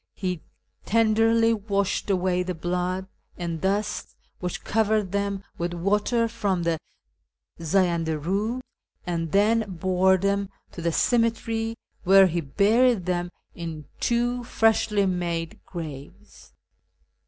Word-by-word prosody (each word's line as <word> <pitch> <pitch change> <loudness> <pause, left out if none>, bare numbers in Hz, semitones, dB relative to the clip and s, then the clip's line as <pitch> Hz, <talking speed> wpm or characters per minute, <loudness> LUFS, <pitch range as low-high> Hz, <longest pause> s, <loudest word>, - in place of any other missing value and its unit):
He 180 -4 -3 0.4
tenderly 225 +1 +3
washed 200 -2 -1
away 185 -1 +1
the 180 0 -3
blood 180 +2 -2 0.3
and 170 -2 -4
dust 205 +2 -1 0.2
which 180 -1 -4
covered 215 -3 +1
them 200 -1 -1 0.2
wdth 175 +1 -2
water 210 +6 +1
from 200 -6 -1
the 165 -1 0 0.8
Zayanda 170 -1 +1
Eud, 205 - -1 0.4
and 165 -3 -2
then 220 +3 +4
bore 185 +1 +2
them 200 +1 0 0.2
to 170 - -8
the 170 - +1
ceme 230 +7 +3
tery, 225 0 -3 0.3
where 195 +1 +7
he 175 -1 0
buried 210 - +3
them 175 -1 -1 0.2
in 160 -3 -6
two 240 +1 0
freshly 225 -3 +2
made 170 -3 -2
graves. 150 -5 -9
190 Hz, 120 wpm, -25 LUFS, 175-220 Hz, 0.8 s, where